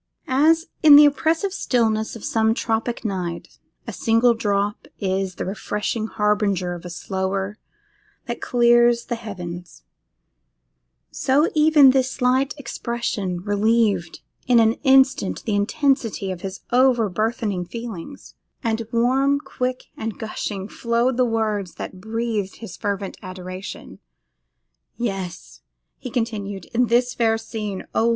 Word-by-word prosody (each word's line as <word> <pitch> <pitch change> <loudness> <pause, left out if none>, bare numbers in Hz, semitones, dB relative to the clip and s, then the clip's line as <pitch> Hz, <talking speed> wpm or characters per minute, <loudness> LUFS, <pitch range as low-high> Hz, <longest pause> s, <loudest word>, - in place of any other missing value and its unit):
As, 315 +5 +3 0.2
in 300 -3 +9
the 295 +1 +10
oppressive 325 +6 +1
stillness 220 - 0
of 225 - -8
some 225 0 +2
tropic 230 0 -2
night, 180 -5 -4 0.3
a - - -6
single 230 0 +3
drop 205 -2 -1
is 190 -1 -1
the - - -4
refreshing 210 +3 -3
harbinger 205 -4 0
of 175 - -8
a - - -6
slower 190 +3 -3 0.7
that 240 -2 -5
clears 240 -1 +4
the - - -3
heavens, 180 -6 -8 1.3
so 285 +5 +2
even 300 -3 +6
this 260 -1 +2
slight 260 +2 +1
expression 235 -8 -3
relieved 205 -3 +1 0.3
in 245 -2 +5
an 225 0 +4
instant 265 -6 +3
the 215 - -2
intensity 225 -2 0
of 180 -2 -6
his 190 0 -6
over 245 -3 +4
burthened 205 -3 -2
feelings, 235 +2 -8 0.3
and 225 -1 -1
warm, 265 +4 +2
quick, 255 -3 -3
and 220 -1 -5
gushing 205 -3 -4
flowed 235 +3 0
the 250 0 +3
words 215 -5 -1
that 185 - -7
breathed 220 -2 -2
his 225 -6 -9
fervid 200 -2 -3
adoration. 185 +1 -8 1.0
'Yes!' 185 - -5 0.4
he 255 - -6
continued, 205 -6 -3
'in 245 +1 +2
this 245 +2 +2
fair 225 -1 +2
scene, 215 -3 -5
oh! 230 - +2
225 Hz, 130 wpm, -22 LUFS, 195-245 Hz, 1.3 s, the